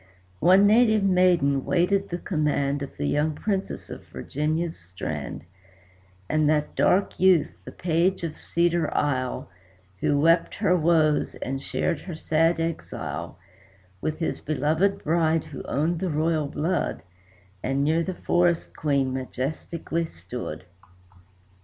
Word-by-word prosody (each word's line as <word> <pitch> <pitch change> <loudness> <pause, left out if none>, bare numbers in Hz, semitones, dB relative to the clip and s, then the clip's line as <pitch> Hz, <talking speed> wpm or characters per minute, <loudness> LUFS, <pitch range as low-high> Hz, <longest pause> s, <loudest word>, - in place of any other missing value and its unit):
One 185 +4 +6
native 220 -1 +5
maiden 180 -8 +3
waited 195 +3 +1
the 175 - -2
command 145 -5 0
Of 140 - -7
the 145 - -2
young 150 +1 +1
Princess 195 +2 -3
of - - -8
Virginia's 155 +3 -2
strand; 90 +1 -6 0.8
And 155 +3 +2
that 150 -1 +1
dark 195 +2 +2
youth, 185 -4 +4
the - - -8
Page 175 +2 0
of 160 -2 -4
Cedar 170 -1 +1
Isle, 130 -3 -1 0.5
Who 145 +6 +2
wept 165 +3 +3
her 200 -3 +2
woes, 155 -3 +2
and 135 +1 -4
shared 165 +3 -1
her 175 -1 -7
sad 165 +2 +1
exile, 165 0 -4 0.6
With 155 0 -2
his 160 - -2
loved 155 +6 +1
bride, 165 0 +2
who 155 -3 -8
owned 160 +5 0
the 185 - -1
royal 155 0 0
blood, 160 +6 -2 0.6
And 135 +2 0
near 160 +3 +2
the 185 +2 -3
forest 175 -1 +1
Queen 140 -4 0
majestically 150 +6 -3
stood. 90 - -7
160 Hz, 130 wpm, -25 LUFS, 145-175 Hz, 0.8 s, One